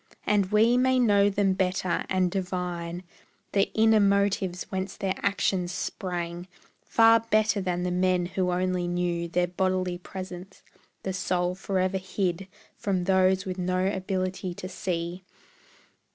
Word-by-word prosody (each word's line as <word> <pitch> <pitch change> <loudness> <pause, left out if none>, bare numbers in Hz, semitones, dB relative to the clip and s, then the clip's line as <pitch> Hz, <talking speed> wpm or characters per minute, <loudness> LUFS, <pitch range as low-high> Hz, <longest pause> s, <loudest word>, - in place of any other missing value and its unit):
And 205 -2 +2
we 225 +3 +4
may 260 0 +3
know 205 -5 +4
them 195 -1 +1
better, 185 -1 0
and 185 -2 +1
divine 180 -2 -3 0.5
The 195 0 +2
inner 220 0 +5
motives 200 -2 +1
whence 190 0 -3
their 190 -1 -1
actions 190 -3 0
sprang, 175 -1 -4 0.3
Far 225 0 +5
better 215 -2 +1
than 180 -1 -1
the 180 - -1
men 180 0 +2
who 185 0 -1
only 180 0 0
knew 175 -1 -1
Their 175 +1 +1
bodily 185 0 -1
presence, 185 0 -9 0.4
the 190 - -2
soul 180 -1 0
forever 190 0 -1
hid 185 -1 -2 0.3
From 190 -3 0
those 190 0 +3
with 185 -1 -4
no 185 +1 0
ability 185 -2 -2
to 185 - -6
see. 180 -2 -4
185 Hz, 135 wpm, -27 LUFS, 180-195 Hz, 0.5 s, inner